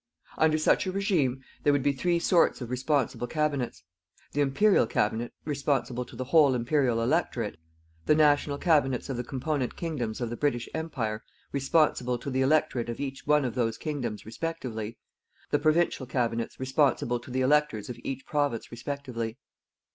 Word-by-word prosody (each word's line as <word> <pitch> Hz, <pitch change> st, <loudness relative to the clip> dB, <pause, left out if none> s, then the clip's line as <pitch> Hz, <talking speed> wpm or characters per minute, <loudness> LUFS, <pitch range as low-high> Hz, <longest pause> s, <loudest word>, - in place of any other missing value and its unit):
Under 155 Hz, 0 st, +4 dB
such 155 Hz, -, +2 dB
a -, -, 0 dB
regime, 170 Hz, -, 0 dB, 0.2 s
there 145 Hz, -, +4 dB
would 145 Hz, -2 st, +1 dB
be 145 Hz, -, +3 dB
three 170 Hz, +5 st, +1 dB
sorts 170 Hz, 0 st, +3 dB
of 120 Hz, -2 st, -6 dB
responsible 130 Hz, -1 st, 0 dB
Cabinets: 145 Hz, -, -1 dB, 0.5 s
The 145 Hz, -, 0 dB
Imperial 145 Hz, -, +4 dB
Cabinet 110 Hz, +3 st, 0 dB
responsible 140 Hz, -4 st, -1 dB
to 120 Hz, -, -13 dB
the 130 Hz, -, -3 dB
whole 140 Hz, -1 st, +5 dB
Imperial 125 Hz, -2 st, +1 dB
electorate; 120 Hz, -, 0 dB, 0.5 s
the 150 Hz, -, +5 dB
National 145 Hz, -1 st, +3 dB
Cabinets 145 Hz, -7 st, +2 dB
of 135 Hz, -, -2 dB
the 120 Hz, -, -2 dB
component 135 Hz, +1 st, -2 dB
Kingdoms 130 Hz, -10 st, -3 dB
of 120 Hz, -2 st, -3 dB
the -, -, -3 dB
British 120 Hz, -4 st, 0 dB
Empire 125 Hz, -10 st, -3 dB, 0.3 s
responsible 135 Hz, -3 st, +2 dB
to 135 Hz, +4 st, -6 dB
the 130 Hz, +1 st, +1 dB
electorate 130 Hz, -4 st, +2 dB
of 115 Hz, -, -4 dB
each 135 Hz, -1 st, -5 dB
one 150 Hz, -2 st, +4 dB
of 120 Hz, -, -2 dB
those 115 Hz, -3 st, 0 dB
Kingdoms 125 Hz, -9 st, -4 dB
respectively; 115 Hz, -4 st, -5 dB, 0.5 s
the 145 Hz, -, +3 dB
Provincial 155 Hz, -3 st, +2 dB
Cabinets 115 Hz, -2 st, -1 dB
responsible 130 Hz, -2 st, +1 dB
to 120 Hz, -, -13 dB
the 130 Hz, +1 st, -1 dB
electors 135 Hz, -6 st, +2 dB
of 120 Hz, -1 st, -7 dB
each 135 Hz, 0 st, -4 dB
province 145 Hz, -6 st, -1 dB
respectively. 120 Hz, -2 st, -4 dB
135 Hz, 160 wpm, -28 LUFS, 120-150 Hz, 0.5 s, whole